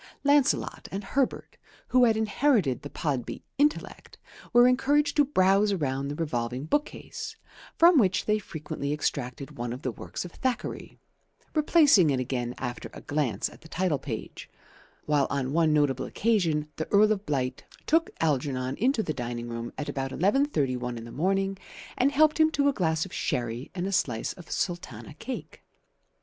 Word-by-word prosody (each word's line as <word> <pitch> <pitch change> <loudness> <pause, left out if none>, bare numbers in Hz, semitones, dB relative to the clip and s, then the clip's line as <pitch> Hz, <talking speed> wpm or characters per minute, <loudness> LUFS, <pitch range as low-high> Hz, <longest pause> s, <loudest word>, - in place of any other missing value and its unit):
Lancelot 285 -1 +2
and 195 +2 -4
Herbert, 255 +6 -1 0.3
who 255 -1 +5
had 225 -2 +3
inherited 220 - +2
the 145 - -7
Podby 140 -7 -3 0.2
intellect, 295 +1 -1 0.3
were 240 +1 +7
encouraged 285 +3 +2
to 295 - +6
browse 200 -5 +3
around 140 -6 -1
the 145 - -4
revolving 125 -4 -2
bookcase, 290 - -3 0.4
from 335 -2 +7
which 195 -4 +2
they 215 0 +2
frequently 150 -5 -5
extracted 130 -3 -3
one 120 0 -3
of 125 +4 -7
the 130 - -1
works 115 - -6
of 175 - -8
Thackeray, 255 +5 -3 0.6
replacing 295 - +5
it 135 -2 +1
again 125 -1 -3
after 125 -2 -5
a - - -9
glance 145 -6 -1
at - - -15
the 160 - -13
title 170 -3 0
page; 125 -5 -7 0.6
while 145 -2 +2
on 140 -1 -2
one 160 -1 +3
notable 145 -4 +2
occasion 170 -9 +1
the 155 - -3
Earl 210 +1 +5
of 205 -1 -2
Blight 130 -3 -1 0.2
took 325 +1 +2
Algernon 135 -4 0
into 245 0 +2
the 155 - -2
dining 120 -2 -5
room 115 0 -5
at 150 - -4
about 135 -1 -3
11.31 135 - 0
in 115 - -7
the 115 - -10
morning 195 +5 0 0.4
and 265 +3 +2
helped 305 +2 +4
him 315 0 +6
to 285 -1 +2
a 285 - +3
glass 160 -7 0
of 190 - -11
sherry 120 +2 -2
and 180 -1 -2
a 195 - -2
slice 125 - 0
of 175 - -14
sultana 175 -2 -4
cake. 255 - -7
160 Hz, 165 wpm, -27 LUFS, -, 0.6 s, were